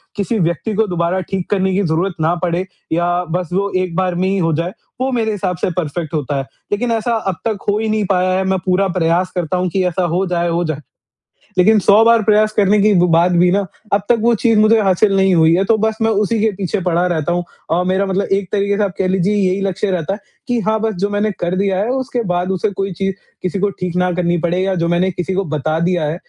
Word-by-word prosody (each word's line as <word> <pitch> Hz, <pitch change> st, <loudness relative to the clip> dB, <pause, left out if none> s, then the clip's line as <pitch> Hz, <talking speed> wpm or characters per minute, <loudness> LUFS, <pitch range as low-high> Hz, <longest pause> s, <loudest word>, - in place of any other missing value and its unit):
किसी 205 Hz, +2 st, -1 dB
व्यक्ति 170 Hz, +5 st, -1 dB
को 220 Hz, +2 st, +2 dB
दोबारा 175 Hz, 0 st, -1 dB
ठीक 185 Hz, 0 st, -4 dB
करने 190 Hz, -2 st, +1 dB
की 195 Hz, -, +1 dB
ज़रूरत 175 Hz, +3 st, 0 dB
ना 160 Hz, +2 st, +2 dB
पड़े 175 Hz, +1 st, 0 dB, 0.3 s
या 175 Hz, +2 st, +1 dB
बस 180 Hz, -2 st, -2 dB
वो 200 Hz, +2 st, 0 dB
एक 185 Hz, -2 st, -2 dB
बार 185 Hz, -1 st, 0 dB
में 185 Hz, +2 st, 0 dB
ही 195 Hz, -, 0 dB
हो 165 Hz, -3 st, +1 dB
जाए, 170 Hz, +4 st, -2 dB, 0.3 s
वो 265 Hz, +1 st, 0 dB
मेरे 225 Hz, -3 st, 0 dB
हिसाब 185 Hz, -3 st, -2 dB
से 180 Hz, -, -1 dB
परफेक्ट 160 Hz, -1 st, -3 dB
होता 145 Hz, -2 st, -2 dB
है। 135 Hz, -, -1 dB, 0.3 s
लेकिन 230 Hz, +4 st, 0 dB
ऐसा 230 Hz, +1 st, 0 dB, 0.2 s
अब -, -, -7 dB
तक 220 Hz, -2 st, 0 dB
हो 205 Hz, -, +2 dB
ही 220 Hz, 0 st, -1 dB
नहीं 215 Hz, -1 st, 0 dB
पाया 185 Hz, -1 st, +2 dB
है 190 Hz, -, 0 dB
मैं 190 Hz, 0 st, 0 dB
पूरा 190 Hz, +1 st, +2 dB
प्रयास 180 Hz, 0 st, 0 dB
करता 175 Hz, 0 st, -1 dB
हूँ 180 Hz, 0 st, 0 dB
कि 190 Hz, +2 st, 0 dB
ऐसा 180 Hz, +1 st, -1 dB
हो 190 Hz, +2 st, +1 dB
जाए 175 Hz, -1 st, 0 dB
हो 170 Hz, +1 st, 0 dB
जाए। 155 Hz, -2 st, -3 dB, 0.8 s
लेकिन 210 Hz, +4 st, +5 dB
100 205 Hz, +3 st, +5 dB
बार 230 Hz, 0 st, +5 dB
प्रयास 215 Hz, 0 st, +3 dB
करने 205 Hz, 0 st, +4 dB
के 210 Hz, 0 st, +4 dB
ब 180 Hz, -, +4 dB
बाद 170 Hz, +2 st, +4 dB
भी 180 Hz, +1 st, +4 dB
ना 200 Hz, +1 st, +1 dB, 0.3 s
अब 200 Hz, -, +3 dB
तक 240 Hz, -, +4 dB
वो 235 Hz, +1 st, +3 dB
चीज़ 225 Hz, -3 st, +4 dB
मुझे 220 Hz, +1 st, +5 dB
हासिल 195 Hz, +1 st, +2 dB
नहीं 190 Hz, -1 st, +3 dB
हुई 160 Hz, 0 st, +4 dB
है 190 Hz, -, +2 dB
तो 220 Hz, +2 st, +3 dB
बस 220 Hz, 0 st, 0 dB
मैं 225 Hz, -, +3 dB, 0.2 s
उसी 225 Hz, +2 st, -1 dB
के 220 Hz, 0 st, +2 dB
पीछे 195 Hz, +1 st, -2 dB
पड़ा 175 Hz, 0 st, +1 dB
रहता 170 Hz, -1 st, -1 dB
हूँ। 175 Hz, 0 st, 0 dB, 0.3 s
अ, 175 Hz, +2 st, +2 dB
मेरा 190 Hz, +1 st, +1 dB
मतलब 195 Hz, +1 st, -1 dB
एक 195 Hz, -1 st, 0 dB
तरीके 200 Hz, 0 st, 0 dB
से 210 Hz, -, +1 dB
आप 195 Hz, -2 st, -2 dB
कह 190 Hz, -, 0 dB
लीजिए 190 Hz, +2 st, +1 dB
यही 195 Hz, -1 st, +1 dB
लक्ष्य 195 Hz, +1 st, -1 dB
रहता 180 Hz, 0 st, -1 dB
है 205 Hz, -, -6 dB, 0.3 s
कि 245 Hz, -2 st, 0 dB
हाँ, 220 Hz, 0 st, 0 dB
बस 225 Hz, -1 st, 0 dB
जो 200 Hz, +3 st, -1 dB
मैंने 205 Hz, +1 st, 0 dB
कर 175 Hz, +1 st, -1 dB
दिया 195 Hz, -1 st, 0 dB
है 210 Hz, +4 st, -1 dB
उसके 255 Hz, -2 st, -2 dB
बाद 180 Hz, +1 st, -1 dB
उसे 190 Hz, +3 st, 0 dB
कोई 195 Hz, 0 st, -3 dB
चीज़ 195 Hz, +2 st, -2 dB, 0.3 s
किसी 185 Hz, +1 st, -2 dB
को 205 Hz, +2 st, +1 dB
ठीक 180 Hz, -1 st, -3 dB
ना 180 Hz, 0 st, +1 dB
करनी 175 Hz, 0 st, 0 dB
पड़े 175 Hz, +1 st, 0 dB
या 190 Hz, 0 st, 0 dB
जो 170 Hz, -1 st, 0 dB
मैंने 175 Hz, +2 st, +1 dB
किसी 180 Hz, +1 st, -3 dB
को 195 Hz, +1 st, 0 dB
बता 155 Hz, +2 st, -1 dB
दिया 175 Hz, 0 st, 0 dB
है, 150 Hz, +2 st, -2 dB
190 Hz, 260 wpm, -17 LUFS, 175-205 Hz, 0.8 s, लेकिन